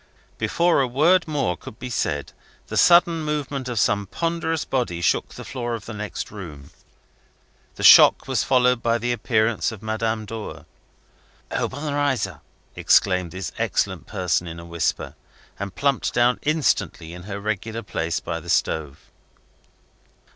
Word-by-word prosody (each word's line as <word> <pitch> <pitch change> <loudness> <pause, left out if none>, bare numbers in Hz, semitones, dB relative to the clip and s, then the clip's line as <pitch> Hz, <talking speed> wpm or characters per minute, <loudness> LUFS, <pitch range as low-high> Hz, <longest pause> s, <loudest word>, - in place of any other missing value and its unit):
Before 170 -3 +2
a 130 - +1
word 165 +9 +3
more 140 - 0
could 105 - -12
be 125 - -7
said, 75 -9 -2 0.4
the - - -5
sudden 170 -1 +5
movement 145 -3 -3
of 120 - -4
some 100 0 +1
ponderous 165 - -2
body 120 -10 -1
shook 85 - +1
the - - -9
floor 120 -3 -3
of 110 - -9
the 115 - -7
next 105 0 -5
room. 80 -9 -10 1.0
The - - -7
shock - - +8
was - - +1
followed 125 -2 +3
by 115 0 +1
the 120 +1 -2
appearance 115 -1 +1
of 110 -2 -10
Madame 110 0 -2
Dor. 105 -9 -7 0.9
"Obenreizer" 145 -4 -1 0.3
exclaimed 90 -3 +3
this 95 +3 -6
excellent 95 -3 -1
person 90 -3 -1
in 85 0 -7
a 85 - -10
whisper, 85 -2 -2 0.5
and 100 -1 -5
plumped 140 -2 0
down 120 +1 +3
instantly 150 - 0
in 90 - -9
her 100 0 -4
regular 110 +2 -3
place 85 -4 -2
by 85 -1 -4
the 85 +1 -11
stove. 75 -3 -1
110 Hz, 145 wpm, -23 LUFS, 90-135 Hz, 1.0 s, shock